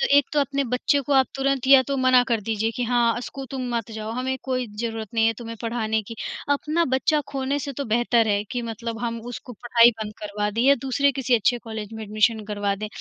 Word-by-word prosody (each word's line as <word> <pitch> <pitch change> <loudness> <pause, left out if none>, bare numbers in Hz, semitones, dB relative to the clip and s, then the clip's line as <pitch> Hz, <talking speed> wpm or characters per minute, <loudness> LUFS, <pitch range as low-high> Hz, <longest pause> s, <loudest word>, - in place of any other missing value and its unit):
तो - - +3
एक 285 - +5
तो 295 - +3
अपने 275 0 0
बच्चे 250 +4 +1
को 280 +1 -3
आप 265 -2 +5
तुरंत 270 -1 0
या 270 -1 +8
तो 275 - 0
मना 255 -1 +5
कर 230 -2 +1
दीजिए 220 +1 -1
कि 250 - -1
हाँ, 240 -1 +2
अ, - - -3
स्कू 270 +2 -7
तुम 255 -2 -4
मत 230 0 -3
जाओ 220 0 -5
हमें 260 +2 -2
कोई 255 -2 -2
ज़रूरत 225 -2 -4
नहीं 225 0 +3
है 225 - +3
तुम्हें 230 -1 -7
पढ़ाने 220 -2 -1
की। - - -5 0.4
अपना 310 +4 0
बच्चा 300 +3 +2
खोने 275 +1 -1
से 280 0 -5
तो 280 +2 -4
बेहतर 230 0 +2
है 205 0 +1
कि 245 -2 -2
मतलब 230 0 -5
हम 230 -1 -2
उसको 245 - -8
पढ़ाई 235 +1 +5
बंद 210 0 -6
करवा 210 0 -3
दें 225 +3 -2
या 280 +2 +6
दूसरे 280 +1 +2
किसी 255 -2 +1
अच्छे 240 +2 +2
कॉलेज 220 -1 -6
में 220 0 -6
एडमिशन 215 +1 +1
करवा 205 -1 -1
दें। 215 +2 -4
240 Hz, 240 wpm, -24 LUFS, 220-265 Hz, 0.4 s, या